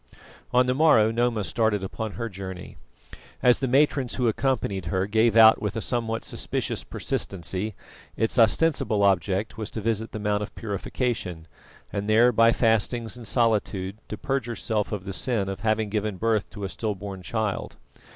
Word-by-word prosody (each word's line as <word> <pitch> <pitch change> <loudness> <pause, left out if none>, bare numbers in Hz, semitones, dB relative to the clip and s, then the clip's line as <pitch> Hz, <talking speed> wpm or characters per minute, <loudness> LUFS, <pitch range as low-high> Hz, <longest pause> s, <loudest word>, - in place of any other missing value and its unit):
On 125 +1 +4
the 125 - +1
morrow 130 -7 +5
Noma 115 -2 0
started 110 -1 0
upon 110 +2 -5
her 115 -1 -4
journey. 95 -3 -8 0.7
As 125 -1 +5
the 135 - -1
matrons 135 -1 +2
who 125 -2 +1
accompanied 110 -5 -1
her 95 -1 0
gave 110 +2 +2
out 110 0 +8
with 105 +1 -2
a - - -1
somewhat 115 -2 -2
suspicious - - -3
persistency, 95 +2 -3 0.4
its 110 +2 0
ostensible 115 -3 +3
object 100 +3 +1
was 110 0 -4
to - - -5
visit 110 0 -1
the - - -5
Mount 105 -1 0
of 105 - -6
Purification, 100 -5 -3 0.5
and 100 +1 -3
there 115 +3 +5
by 115 0 +5
fastings 115 0 +1
and 120 -3 -9
solitude 105 -4 0
to 105 - -5
purge 135 -1 -2
herself 110 -2 -2
of 100 -3 -4
the 95 - -5
sin 110 -3 +1
of 95 0 -4
having 110 -1 0
given 105 -1 -2
birth 110 0 0
to 100 - -9
a 95 - -2
stillborn 100 +2 -4
child. 110 +1 -3
110 Hz, 170 wpm, -25 LUFS, 100-115 Hz, 0.7 s, out